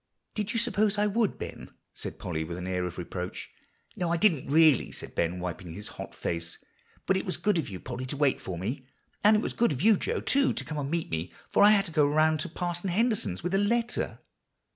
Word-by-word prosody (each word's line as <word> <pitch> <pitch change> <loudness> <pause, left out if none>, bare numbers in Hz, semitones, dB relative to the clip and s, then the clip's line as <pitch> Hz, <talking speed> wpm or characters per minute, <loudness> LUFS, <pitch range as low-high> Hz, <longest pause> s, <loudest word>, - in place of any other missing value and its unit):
"Did 210 0 -2
you 230 - -1
suppose 210 -1 +2
I 205 - +3
would, 210 0 +1
Ben?" - - -7 0.2
said - - -5
Polly 80 -3 -3
with 85 +2 -6
an 90 - -5
air 90 -1 -1
of 90 -1 -6
reproach. 90 +1 -5 0.4
"No, 175 -2 -1
I 170 - +2
didn't 165 -9 +2
really," 155 -3 +5
said - - -7
Ben, 85 +2 0
wiping 90 -1 -5
his 105 +4 -6
hot - - -8
face. 85 0 -3 0.5
"But 190 - +3
it - - -2
was 185 - -1
good 205 -4 +2
of 160 - -3
you, 95 -2 -6
Polly, 130 +4 -5
to 140 - -4
wait 145 -2 +2
for 90 -2 -5
me. 125 +9 -4 0.4
And 210 +1 +7
it 210 - +2
was - - -2
good 235 - +2
of 140 +2 -2
you 220 -1 +6
Joe, - - -1
too, 275 0 +2
to - - -5
come 155 - -5
to - - -2
meet 165 +4 -2
me, 80 +1 -2 0.2
for - - +3
I 205 - +9
had 205 -2 +5
to 170 - -6
go 150 -2 +4
around 155 +1 +3
to - - -3
Parson 175 +2 -2
Henderson's 215 - +1
with 175 +2 -2
a 195 - +4
letter." 230 +3 0
155 Hz, 240 wpm, -28 LUFS, -, 0.5 s, I